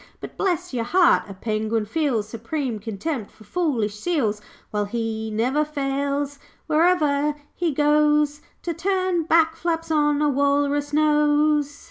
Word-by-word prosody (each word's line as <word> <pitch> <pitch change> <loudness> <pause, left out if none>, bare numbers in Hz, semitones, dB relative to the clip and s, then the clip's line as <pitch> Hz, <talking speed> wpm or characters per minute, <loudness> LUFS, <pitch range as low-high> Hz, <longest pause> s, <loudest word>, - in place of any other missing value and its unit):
But - - -9
bless 360 -8 -1
your 240 -2 -1
heart, 345 - +3
a 195 - -8
penguin 215 +2 -1
feels 235 -4 -1
Supreme 230 +2 -4
contempt 220 +3 -4
for 215 - -18
foolish 225 - -1
seals, 225 -10 0 0.3
While 210 -1 0
he 220 0 -3
never 250 +8 +1
fails, 280 -1 -2 0.3
where'er 305 -3 +2 0.2
he 345 -2 -1
goes, 295 0 +2 0.2
To 340 - -2
turn 370 0 0
back 320 0 +3
flaps 330 -1 -2
on 295 -1 +2
a 300 - +2
walrus 285 +1 +1
nose.' 295 -1 +2
290 Hz, 135 wpm, -23 LUFS, 230-310 Hz, 0.3 s, heart